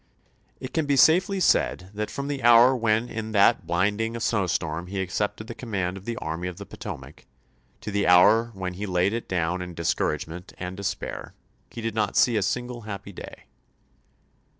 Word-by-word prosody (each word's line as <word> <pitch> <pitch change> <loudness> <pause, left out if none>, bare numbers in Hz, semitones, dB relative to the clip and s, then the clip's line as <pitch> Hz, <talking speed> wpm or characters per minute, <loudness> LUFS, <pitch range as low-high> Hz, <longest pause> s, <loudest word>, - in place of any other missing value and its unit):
It 130 - -7
can 160 -3 0
be 140 - +3
safely 185 +7 +4
said 95 - +1
that 105 +1 -3
from 140 0 -5
the 145 -2 -3
hour 120 +2 +7
when 115 -1 +1
in 110 -2 -5
that 100 -1 +4
blinding 105 +6 0
snow 110 -4 0
storm 85 0 -2
he 95 +1 -4
accepted 105 +3 -2
the 120 - -7
com 120 0 -10
mand 95 -3 -1
of 95 0 -10
the 115 -1 -4
Army 80 +3 -4
of 90 -1 -6
the 100 - -8
Potomac, - - -9 0.5
to 105 - -5
the 100 0 0
hour 105 +6 +6
when 95 -1 -4
he 100 +3 -5
laid 90 +2 +1
it 115 - -4
down 90 0 -1
in 90 -1 -7
discouragement 85 +1 -2
and 90 +1 -5
de 100 - -8
spair, 95 - -4 0.4
he 115 - -8
did 115 -1 -2
not 105 -2 -1
see 120 - +4
a 105 - +2
single 120 +4 -2
happy 100 -2 -7
day. 90 - -10
105 Hz, 195 wpm, -25 LUFS, 90-115 Hz, 0.5 s, hour